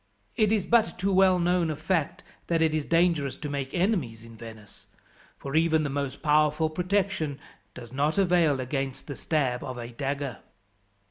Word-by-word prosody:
It 215 -1 +2
is 210 -4 +1
but 225 -5 +2
too 195 +2 0
well 185 -1 +5
known 175 -1 +1
a 155 - -2
fact 160 0 -1 0.2
that 165 -1 +1
it 160 -1 +2
is 155 -2 -1
dangerous 165 -5 +1
to 150 - -6
make 140 -2 -3
enemies 170 - -1
in 115 0 -13
Venice, 110 -2 -13 0.5
for 140 +1 -6
even 160 -1 +3
the 145 - -2
most 140 -1 -4
powerful 150 +1 +2
protection 180 -4 -1 0.4
does 120 -1 -10
not 145 +5 0
avail 175 -7 +3
against 135 +1 -3
the 140 - -6
stab 130 -6 -1
of 130 -1 -6
a 120 -1 -6
dagger." 140 +1 -4
155 Hz, 175 wpm, -27 LUFS, 135-175 Hz, 0.5 s, well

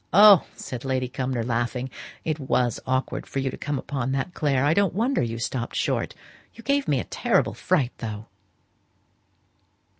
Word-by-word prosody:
'" - - -35 0.2
"Oh!" 190 - +5
said 125 -2 -6
Lady 130 -1 0
Cumnor, 130 -1 -2
laughing, 120 +2 -1 0.3
"it 155 -1 -1
was 125 -4 +1
awkward 130 +1 -1
for - - -6
you 135 -1 0
to - - -6
come 145 -1 -2
upon 135 -1 -2
that, 135 +7 -2
Clare: 140 -3 +1
I 150 - +4
don't 195 -2 +2
wonder 245 +6 +1
you 115 -1 -2
stopped 120 +1 -3
short. - - -1 0.4
You 230 - -12
gave 280 +3 +1
me 140 -3 +2
a - - -2
terrible - - +1
fright, 145 -9 +1
though." 110 -1 -5
130 Hz, 175 wpm, -25 LUFS, 125-150 Hz, 0.4 s, Oh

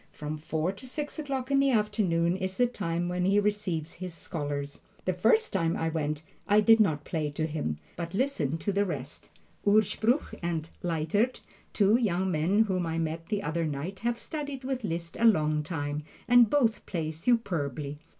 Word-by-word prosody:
From 150 0 -5
four 160 +3 -1
to 200 +7 -12
six 295 +4 -4
o'clock 275 -3 -3
in 275 - +4
the 275 0 +4
afternoon 210 -7 +2
is 190 0 -3
the 245 - +5
time 175 -8 -2
when 180 0 -1
he 195 +3 +4
receives 200 -6 -1
his 180 -1 -7
scholars. 145 -4 -4 0.2
The 185 - +1
first 220 - +3
time 165 -4 +1
I 165 - 0
went 150 -1 -2 0.2
I 205 +1 +5
did 225 +1 +6
not 155 -8 +2
play 155 -3 -1
to 150 +2 -2
him, 150 - -2 0.2
but 170 +1 -4
listened 165 - 0
to 200 - 0
the 200 +1 +2
rest. 150 -7 -5 0.3
Urspruch 215 +5 +2
and 165 -2 -2
Leitert, 175 +8 0 0.3
two 210 +2 +4
young 190 -5 +1
men 180 +7 +3
whom 185 -5 -1
I 165 0 -2
met 165 0 -2
the 205 -2 -1
other 165 -1 -1
night, 155 +7 -4
have 235 0 0
studied 285 -1 -5
with 260 -1 -2
Liszt 170 -3 -4
a 230 - +3
long 155 -8 +4
time, 145 -2 -3 0.3
and 245 -2 +7
both 240 -5 +2
play 160 -4 -2
superbly. 155 - -1
180 Hz, 180 wpm, -29 LUFS, 160-220 Hz, 0.3 s, and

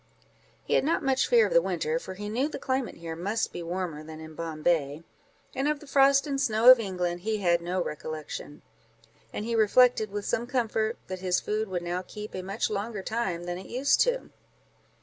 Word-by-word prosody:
He - - -2
had - - +4
not 315 +2 +1
much 265 -1 +2
fear 470 -2 +5
of - - -2
the - - +6
winter, 475 0 -1
for 185 - -8
he 205 +2 -6
knew 245 +7 0
the - - -5
climate 260 -2 -2
here 165 -1 -6
must 205 +7 -2
be - - -5
warmer 170 -3 -4
than 155 0 -9
in 160 0 -10
Bombay; 155 -1 -1 0.5
and 270 +2 -1
of 300 -1 0
the 300 - -13
frost 275 0 +4
and 275 -2 -2
snow 225 0 +7
of 255 - +7
England, 180 -4 -2
he 215 +4 -1
had 175 -4 +2
no 180 +1 -1
recollection; 155 -1 -7 0.7
and 210 - -4
he 235 - -2
reflected, 225 0 +4
with 205 0 -5
some 235 +2 -1
comfort, 225 -3 0
that 185 0 -6
his 180 -1 +1
food 215 +1 -2
would 180 -2 -3
now 175 +1 -2
keep 210 +3 -9
a 185 - -4
much 195 +4 -2
longer 210 -1 -4
time 195 -7 -2
than 175 0 -4
it 190 - -10
used 265 +3 +2
to - - +3
do. - - -18
210 Hz, 210 wpm, -28 LUFS, 175-250 Hz, 0.7 s, snow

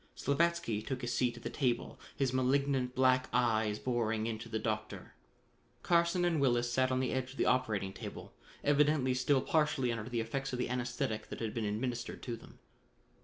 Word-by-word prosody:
Slavatsky 150 -6 +1
took 130 +2 -4
his 120 0 -1
seat 125 -1 +1
at - - -12
the - - -4
table, 125 -4 -1 0.2
his 135 -2 0
malignant 130 0 +1
black 130 0 +3
eyes 110 -3 +2
boring 115 -3 -1
into 115 0 -4
the 110 - -1
Doctor. 110 -1 -4 0.7
Carson 170 +1 +3
and 165 -4 +1
Willis 120 -2 +2
sat 130 +1 +2
on 130 - +1
the 130 -1 0
edge 130 0 -1
of - - -15
the - - +2
operating 110 -7 +1
table, - - -8 0.3
evidently 145 -2 +3
still 130 +2 +2
partially 150 -6 +1
under 115 0 -4
the 120 -2 -1
effects 135 +4 -3
of - - -1
the 125 - -1
anesthetic 120 -3 -2
that - - -6
had 110 -2 -3
been 115 -2 -2
administered 120 +3 -3
to 120 - -3
them. - - -15
125 Hz, 185 wpm, -33 LUFS, 115-135 Hz, 0.7 s, black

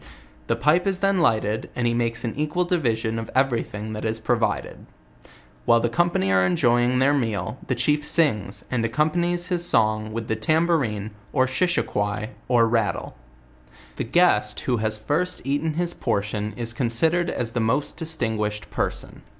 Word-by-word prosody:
The - - +1
pipe 170 +6 +2
is 195 -1 +1
then 195 0 +1
lighted, 110 -8 +1
and 125 -1 -1
he 120 - +2
makes 115 0 -1
an 115 - -2
equal 150 +4 0
division 115 -10 0
of 115 - -6
every 130 -3 +2
thing 105 +1 -7
that 105 - -5
is 110 0 -1
provided. 115 0 -1 0.8
While 115 -1 +5
the 120 - 0
company 145 - +1
are 95 -1 +4
enjoying 120 +7 +2
their 135 +3 +3
meal, 115 -3 -2
the 130 - 0
chief 150 +4 0
sings, 110 - +1
and 120 -3 0
accompanies 175 +8 0
his 175 -1 0
song 110 -8 +2
with 115 0 -4
the 110 - 0
tambo 160 +9 +2
rine, 105 -6 -3 0.2
or 130 -2 +3
shishiquoi, 110 - -1 0.2
or 120 -2 +4
rattle* 110 -6 -1 0.8
The - - -1
guest 115 -7 +2
who 125 -2 0
has 110 0 +1
first 160 +11 -1
eaten 145 +3 -1
his 175 +1 -1
portion 105 -1 -2
is 115 -1 -3
considered 150 +9 +1
as 115 -2 -2
the 125 - -2
most 115 +6 0
distinguished 110 -10 -2
person. - - -3
120 Hz, 165 wpm, -24 LUFS, 110-155 Hz, 0.8 s, While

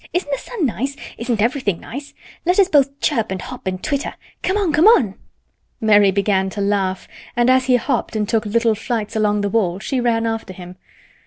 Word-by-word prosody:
Isn't 355 -4 -1
the 275 - -1
sun 430 -10 -3
nice? 270 +3 -2 0.2
Isn't 230 -3 0
everything 230 - 0
nice? 280 +4 -9 0.3
Let 360 +2 +2
us 395 -2 +5
both 280 -3 +2
chirp 230 -7 +1
and 190 0 -3
hop 250 0 -8
and 185 0 -3
twitter. 285 -1 -2 0.3
Come 380 +2 0
on! 380 -7 0
Come 315 +7 +5
on!" 245 - +5 0.7
Mary 205 -3 +5
began 195 0 +1
to 205 - -7
laugh, 195 -2 -1 0.3
and 240 +1 +3
as 260 0 +3
he 255 -1 +4
hopped 230 -1 -1
and 210 -1 0
took 220 0 0
little 230 +1 +2
flights 220 0 -3
along 210 -1 +1
the 205 - -1
wall 195 -5 +1
she 250 +6 -2
ran 230 -1 +1
after 225 -4 -3
him. 180 0 -11
225 Hz, 200 wpm, -20 LUFS, 205-275 Hz, 0.7 s, us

